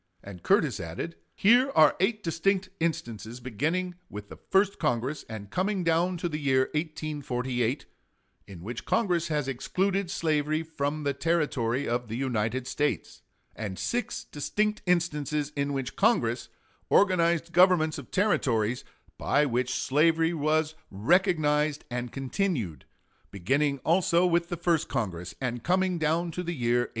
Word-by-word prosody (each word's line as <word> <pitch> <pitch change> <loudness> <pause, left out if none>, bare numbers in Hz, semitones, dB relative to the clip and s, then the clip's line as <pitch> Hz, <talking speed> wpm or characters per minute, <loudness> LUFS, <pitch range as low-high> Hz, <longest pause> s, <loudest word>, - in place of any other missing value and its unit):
And 95 -3 -10
Curtis - - +2
added: 85 - -5 0.2
"Here 245 +6 +5
are 155 -2 +6
eight 210 +3 +1
distinct 185 +3 0
instances, 120 - -3
beginning 155 - -2 0.2
with 105 0 -8
the - - -9
first 195 +1 +3
Congress, 140 0 -1
and 105 -2 -8
coming 190 0 0
down 170 +2 +2
to 170 - -2
the 155 -2 -3
year 130 -2 +2
1848, 140 -5 -2 0.6
in 90 -4 -10
which 115 +4 -6
Congress 175 -7 +1
has 150 -4 -1
excluded 190 +8 -1
slavery 155 -3 0
from 155 -1 -3
the 140 -1 0
territory 140 -5 0
of 120 +1 -1
the 110 +2 -4
United 125 -1 -1
States; 145 +3 -2 0.3
and 100 -4 -5
six 240 -1 -2
distinct 210 +8 -1
instances 150 -4 0
in 140 0 -1
which 135 -2 -3
Congress 125 - +1 0.4
organized 170 -3 +3
governments 170 -3 +4
of 135 - -11
Territories 120 - +1 0.4
by 150 - +2
which 125 -1 0
slavery 165 +4 +2
was 155 0 +1 0.2
recognized 150 - +2
and 125 0 -3
continued, 135 - -2 0.4
beginning 140 +10 0
also 170 +1 +3
with 170 -1 +1
the 175 - -3
first 170 -2 +1
Congress, 90 -8 -3
and 120 -2 -3
coming 185 0 +1
down 165 +2 0
to 180 - -4
the 175 -1 -3
year 120 -2 +2
1822. - - -11
150 Hz, 140 wpm, -28 LUFS, 125-175 Hz, 0.6 s, are